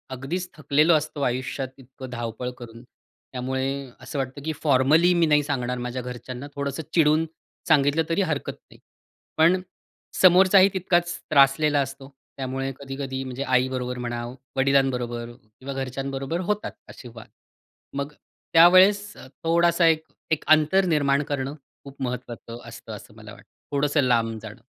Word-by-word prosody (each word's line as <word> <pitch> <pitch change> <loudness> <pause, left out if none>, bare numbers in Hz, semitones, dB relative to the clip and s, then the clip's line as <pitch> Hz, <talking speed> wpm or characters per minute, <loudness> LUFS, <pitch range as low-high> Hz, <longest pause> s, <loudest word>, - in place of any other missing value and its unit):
अगदीच 175 +8 -4
थकलेलो 155 +3 +3
असतो 150 -1 -1
आयुष्यात, 130 +2 -2
इतकं 130 0 -11
धावपळ 120 0 -4
करून, 115 -1 -11
त्यामुळे 130 +2 -5
असं 140 - -5
वाटतं 135 +2 -4
की 160 - -1
फॉर्मली 150 +6 +4
मी 170 -1 +3
नाही 150 -2 +3
सांगणार 125 -3 -2
माझ्या 125 +1 -4
घरच्यांना, 125 +2 -7
थोडंसं 140 +2 -3
चिडून 155 -1 +4 0.4
सांगितलं 150 0 +3
तरी 175 +4 +1
हरकत 160 -6 -2 0.2
नाही. - - -17 0.6
पण 170 +4 +4 0.6
समोरचाही 190 +1 +7
तितकाच 175 -2 0
त्रासलेला 145 +1 +4
असतो, 135 0 -6 0.3
त्यामुळे 135 0 -3
कधी-कधी 135 -1 -5
म्हणजे 130 +1 -5
आईबरोबर 125 -1 0
म्हणा, 120 -1 -4 0.3
वडिलांबरोबर 125 -3 +1
किंवा 130 +3 -10
घरच्यांबरोबर 135 +3 -3
होतात 210 - -3 0.2
असे 125 - -11
वाद. 115 - -11 0.6
मग 140 +1 -3 0.4
त्यावेळेस, 190 +5 +6 0.3
थोडासा 170 +1 +3
एक 160 -1 +3 0.3
एक 155 - +1
अंतर 155 +5 +5
निर्माण 145 -3 +2
करणं 140 -1 -3 0.3
खूप 140 -1 -13
महत्त्वाचं 120 -2 -6
असतं - - -10
असं - - -13
मला - - -11
वाटतं, - - -17 0.2
थोडंसं 145 +1 +2
लांब 115 -3 +1
जाणं. 110 +2 -10
140 Hz, 135 wpm, -24 LUFS, 130-160 Hz, 0.6 s, समोरचाही